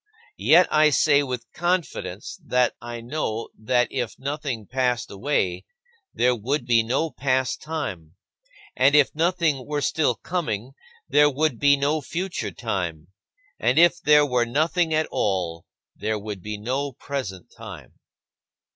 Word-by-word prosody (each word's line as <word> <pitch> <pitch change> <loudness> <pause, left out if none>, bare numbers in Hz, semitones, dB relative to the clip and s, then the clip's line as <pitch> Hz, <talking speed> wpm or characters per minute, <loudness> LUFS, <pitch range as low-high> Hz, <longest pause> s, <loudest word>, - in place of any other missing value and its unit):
Yet 170 +3 +6
I 155 0 +6
say 145 +1 +4
with 125 -4 -4
confidence 170 - -2
that 125 0 +2
I 120 0 -7
know 115 -3 -3
that 120 +2 +1
if 125 -4 -3
nothing 140 -5 -4
passed 125 0 -1
away, 135 +9 -1 0.5
there 125 0 +2
would 130 +7 -2
be 115 -1 +4
no 135 +8 -1
past 130 -1 -1
time; 95 - -5 0.6
and 140 +3 +4
if 145 -2 +5
nothing 165 -4 +1
were 150 0 -1
still 140 -2 +1
coming, 130 - -3 0.4
there 145 0 +5
would 145 -2 0
be 140 0 +5
no 145 +3 0
future 175 +6 -4
time; 90 -8 -4 0.5
and 125 +3 +1
if 175 +1 +5
there 150 0 +5
were 125 -3 +1
nothing 160 +7 +1
at 155 0 +2
all, 90 -5 -1 0.3
there 110 +2 -2
would 105 -2 -6
be 105 +3 -5
no 130 +6 -2
present 115 -10 -6
time. - - -11
130 Hz, 140 wpm, -24 LUFS, 115-150 Hz, 0.6 s, Yet